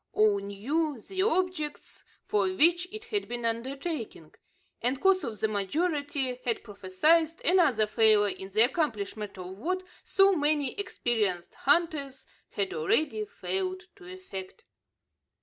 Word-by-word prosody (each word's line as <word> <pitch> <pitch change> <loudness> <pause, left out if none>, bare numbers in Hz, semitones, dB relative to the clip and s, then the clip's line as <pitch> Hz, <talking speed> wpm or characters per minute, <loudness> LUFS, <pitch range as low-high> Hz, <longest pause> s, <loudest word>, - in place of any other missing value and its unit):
All 210 -1 +3
knew 255 +9 -2
the 375 - -4
objects 365 -7 -1 0.2
for 200 -2 +1
which 340 - +3
it 435 +1 -8
had 410 - -1
been 240 -1 -4
undertaken; 235 - -4 0.5
and 255 +3 0
course 385 +1 +3
the 220 -4 -2
majority 280 - -1
had 235 -3 -1
prophesied 300 - +1
another 315 - +4
failure 215 -1 +4
in 190 - -8
the 215 +3 +4
accomplishment 215 - -2
of 185 +1 -8
what 370 +8 -2 0.2
so 390 0 +4
many 295 -3 +1
experienced 215 - -1
hunters 285 -3 +1 0.2
had 200 -2 -2
already 310 - +1
failed 375 -4 -3
to 370 - -15
effect. 370 - -9
275 Hz, 125 wpm, -28 LUFS, 210-345 Hz, 0.5 s, another